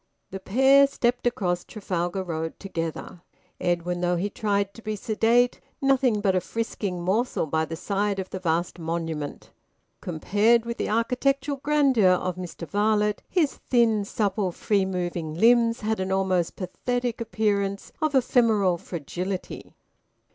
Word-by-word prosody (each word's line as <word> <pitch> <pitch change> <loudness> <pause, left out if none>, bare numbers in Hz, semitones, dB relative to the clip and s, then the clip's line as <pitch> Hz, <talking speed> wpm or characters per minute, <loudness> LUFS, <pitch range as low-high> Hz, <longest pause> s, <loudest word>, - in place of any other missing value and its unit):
The 195 - -5
pair 270 +8 +5
stepped 245 -2 0
across 180 -7 -1
Trafalgar 185 -2 -3
Road 160 -2 -4
together, 165 -2 -5 0.4
Edwin, 175 0 -1
though 175 0 +1
he 195 +4 -2
tried 200 -2 -1
to 230 - -12
be 215 -1 -3
sedate, 230 +3 +2 0.2
nothing 265 -6 +2
but 195 -2 +2
a 185 - +2
frisking 200 -6 -3
morsel 215 +6 0
by 160 +1 0
the 165 - -6
side 200 +3 -1
of 190 -1 -5
the 190 - -4
vast 175 0 -1
monument. 165 -3 -4 0.5
Compared 210 +7 +2
with 235 0 -4
the - - -2
architectural 265 +5 0
grandeur 270 -9 +3
of 180 -1 -1
Mr 175 -2 -7
Varlett, 210 0 +1
his 325 -6 +1
thin, 230 -4 +3
supple, 200 -2 -1
free 200 +2 0
moving 175 -4 -3
limbs 230 +4 +4
had 220 0 -1
an 190 0 -2
almost 190 -3 +1
pathetic 245 +5 -3
appearance 205 -3 -1
of 310 -2 +1
ephemeral 220 -8 +3
fragility. 180 +4 -5
200 Hz, 140 wpm, -25 LUFS, 180-235 Hz, 0.5 s, pair